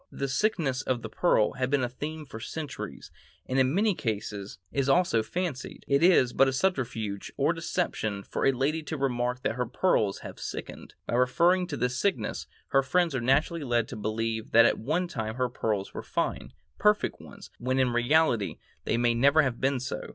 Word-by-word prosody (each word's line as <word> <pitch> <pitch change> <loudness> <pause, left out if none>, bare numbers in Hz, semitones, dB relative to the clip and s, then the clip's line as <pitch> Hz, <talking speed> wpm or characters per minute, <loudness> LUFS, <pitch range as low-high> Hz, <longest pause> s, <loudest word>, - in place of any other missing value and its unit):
The 140 - -3
sickness 135 - 0
of 130 -3 -2
the 110 - -5
pearl 110 -4 +2
has 130 -1 -2
been 140 -2 +2
a - - +1
theme 150 +5 -6
for 115 -5 -9
centuries, 150 +6 -7 0.3
and 130 +1 0
in 130 0 +3
many 205 +5 +2
cases 105 - -4
is 140 -1 0
only 155 -7 +3
fancied. 145 +4 -4
It 140 +1 +3
is 165 -8 +5
but 135 - +5
a 135 - 0
subterfuge 125 - -2
or 145 +4 +2
deception 165 - -2
for - - -4
a - - +6
lady 140 +5 0
to 155 +1 -5
remark 125 -2 -1
that - - 0
her 125 0 -2
pearls 110 - +1
have - - -9
sickened; - - -7
by - - -4
referring 170 +10 +3
to 145 -5 -4
this 125 +1 -1
sickness, 185 - -1 0.2
her 135 - +4
friends 170 +4 +1
are 130 - -1
naturally 145 +6 +1
led 120 -3 +1
to - - -6
believe 110 +1 -2
that 115 0 +8
at - - +2
one 160 +9 -1
time 110 -8 -4
her 125 0 0
pearls 105 -5 -2
were - - -5
fine, - - -3 0.3
perfect 210 0 +2
ones, - - -13
when 130 +2 -1
in 130 -2 +3
reality 120 -3 +2 0.3
they 115 - +1
may 120 0 +3
never 140 +6 +4
have 130 -4 -2
been 135 0 +1
so. 130 - -4
130 Hz, 195 wpm, -28 LUFS, 120-155 Hz, 0.3 s, that